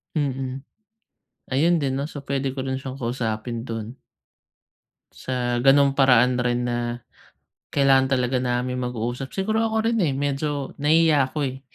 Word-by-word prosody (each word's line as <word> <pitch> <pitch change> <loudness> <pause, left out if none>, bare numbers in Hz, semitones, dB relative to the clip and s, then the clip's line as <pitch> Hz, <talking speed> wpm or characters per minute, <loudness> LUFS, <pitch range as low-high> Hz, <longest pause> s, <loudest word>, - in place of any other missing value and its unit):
Mm. 135 -2 -2 0.9
Ayun 160 +4 +2
din 135 -1 -1
'no? 140 - -2
So, 145 -2 -8
pwede 135 -1 -2
ko 135 - -3
rin 130 0 -2
siyang 135 -1 -7
kausapin 115 -2 -3
dun. 115 +2 -6 1.1
Sa 120 -1 -2
ganung 140 +1 +5
paraan 125 -2 +4
rin 125 0 0
na 120 -1 -1 0.9
kailangan 135 -1 +4
talaga 125 +1 0
naming 125 0 -1
mag-uusap. 125 +2 -3
Siguro 215 +3 0
ako 220 0 -1
rin, 230 -1 +1
eh, 145 -6 +1
medyo 140 0 -2
nahihiya 150 -3 +4
ako, 150 - -5
eh. 130 +1 -5
135 Hz, 145 wpm, -23 LUFS, 125-140 Hz, 1.1 s, ganung